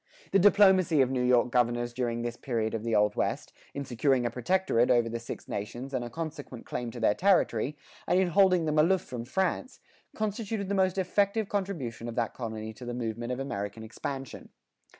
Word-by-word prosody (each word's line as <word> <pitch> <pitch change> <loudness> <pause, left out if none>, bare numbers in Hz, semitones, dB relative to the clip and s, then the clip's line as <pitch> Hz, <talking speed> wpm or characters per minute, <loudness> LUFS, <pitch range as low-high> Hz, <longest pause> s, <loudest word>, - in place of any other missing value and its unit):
The 195 - +5
diplomacy 190 -5 +5
of 130 0 +2
New 130 -1 0
York 125 0 +3
governors 120 -1 +1
during 120 -1 -2
this 120 0 -3
period 115 -4 -2
of 115 - -2
the 115 -1 0
Old 105 0 +3
West, - - -2 0.2
in 140 - -3
securing 125 +1 +1
a 120 - 0
protectorate 125 -1 +1
over 120 -2 +4
the 115 +1 -4
Six 115 - -8
Nations 120 +7 -5
and 130 -2 -1
a 120 - -6
consequent 145 -3 -7
claim 120 -1 -4
to 120 - -8
their 110 -2 +3
territory, 150 - +2 0.3
and 180 - +3
in 185 -2 +2
holding 185 -1 +4
them 155 0 +1
aloof 180 +4 +4
from 120 -2 -7
France, 190 - -2 0.4
constituted 215 -1 -3
the - - 0
most 190 -1 +2
effective 200 +3 +1
contribution 160 - -3
of 115 - -7
that 115 -3 -1
colony 110 -2 -5
to 125 - -12
the 120 0 -4
movement 120 0 -3
of 125 - -3
American 105 -4 -4
expansion. 135 +3 -6
125 Hz, 195 wpm, -29 LUFS, 115-185 Hz, 0.4 s, The